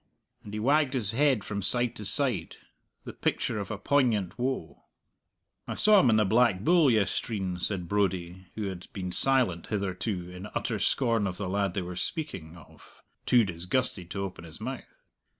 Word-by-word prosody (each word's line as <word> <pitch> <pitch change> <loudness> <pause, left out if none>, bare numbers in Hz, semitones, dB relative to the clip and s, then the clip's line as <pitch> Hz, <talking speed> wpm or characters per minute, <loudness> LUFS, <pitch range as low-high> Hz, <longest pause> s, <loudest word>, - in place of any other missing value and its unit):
and 105 - -10
he - - -3
wagged 140 +3 +2
his 105 -6 +1
head 135 -2 +2
from 100 -1 -4
side 120 +4 0
to 105 - -7
side, 105 - +1 0.5
the - - -8
picture - - -1
of 100 - -5
a 105 - -4
poignant 110 -5 +1
woe. 125 -10 -3 0.8
"I - - -4
saw 210 -1 +5
him 130 - +4
in 110 - +4
the 110 -1 +3
Black 110 -2 +3
Bull 165 - +4
yestreen," 100 -3 -1
said 90 -1 -2
Brodie, 95 -2 -1
who 110 - -4
had 95 -3 -5
been 90 -2 -4
silent 125 -9 +4
hitherto 95 -2 -3
in 90 +3 -8
utter 110 -3 -2
scorn 115 0 +1
of 90 - -5
the 100 - -3
lad 100 -1 -1
they 95 - -1
were 90 0 -7
speaking 90 - -5
of 80 - -18 0.2
too 120 -2 +5
disgusted 90 +1 -1
to 100 +2 -4
open 95 -3 -7
his 80 -2 -11
mouth. - - -8
100 Hz, 180 wpm, -28 LUFS, 90-120 Hz, 0.8 s, saw